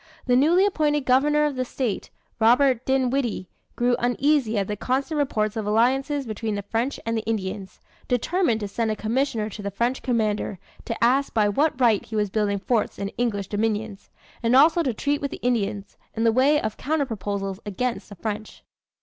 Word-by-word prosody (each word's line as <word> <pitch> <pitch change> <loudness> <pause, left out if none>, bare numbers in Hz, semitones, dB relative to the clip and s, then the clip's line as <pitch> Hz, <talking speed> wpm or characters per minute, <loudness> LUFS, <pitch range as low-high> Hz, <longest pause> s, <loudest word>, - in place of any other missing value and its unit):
The 250 - +3
newly 330 +9 +4
appointed 295 -7 +1
governor 295 +4 +3
of 295 -2 -1
the 255 - -1
state, 245 -4 -3 0.3
Robert 245 +2 +4
Dinwiddie, 260 -6 0 0.3
growing 245 0 +2
uneasy 245 -1 +1
at 195 -1 0
the 210 - -2
constant 270 - -1
reports 215 -6 0
of 220 -2 -3
alliances 270 +6 +1
between 220 -1 -3
the 200 - -4
French 230 +7 -2
and 230 -1 -1
Indians, 195 -3 -4 0.3
determined 250 - +1
to 205 - -2
send 225 +3 -2
a 215 - 0
commissioner 225 0 -1
to 210 - -8
the 200 - -3
French 235 +6 -1
commander, 215 -5 -1 0.3
to 230 - -3
ask 265 +3 +2
by 215 -2 +4
what 285 +6 +1
right 230 -5 +3
he 220 - -8
was 210 -2 0
building 205 -1 0
forts 220 +3 -1
in 200 - -3
English 210 -3 -2
dominions; 210 -1 -2 0.3
and 235 +1 +2
also 320 +5 +6
to 275 -6 0
treat 285 +6 -1
with 280 - -2
the - - -9
Indians, 205 -5 -1 0.2
in 225 - -1
the 230 - +4
way 275 +5 +4
of 215 -4 -4
counter 295 +1 0
proposals 200 -4 -4
against 230 +5 -3
the 205 - -10
French. 215 +3 -6
230 Hz, 185 wpm, -24 LUFS, 210-270 Hz, 0.3 s, also